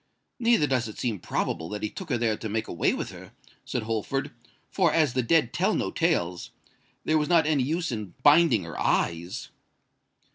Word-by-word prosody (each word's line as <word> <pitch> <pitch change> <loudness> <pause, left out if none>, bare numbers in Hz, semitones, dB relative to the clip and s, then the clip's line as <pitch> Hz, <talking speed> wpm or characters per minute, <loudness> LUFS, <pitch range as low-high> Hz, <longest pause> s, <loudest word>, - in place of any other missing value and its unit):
"Neither 235 -9 +4
does 130 -4 0
it 110 - -9
seem 115 -6 -2
probable 80 0 -2
that 105 0 -5
he 105 - -1
took 190 - -8
her 125 - +1
there 115 -2 +1
to 110 - -6
make 110 +1 -2
away 85 - +1
with - - -4
her," - - -12 0.3
said - - -3
Holford; 115 +5 -2 0.4
"for, 180 -5 +2
as 155 -5 +2
the 130 - +1
dead 135 +1 +2
tell - - +1
no - - -1
tales, 85 0 0 0.6
there 155 0 +3
was 150 - -1
not 170 -3 +4
any 150 -3 +2
use 160 +4 -1
in 105 -5 -5
binding 145 - +5
her 80 -2 -7
eyes." 85 +8 -1
125 Hz, 190 wpm, -26 LUFS, 105-155 Hz, 0.6 s, binding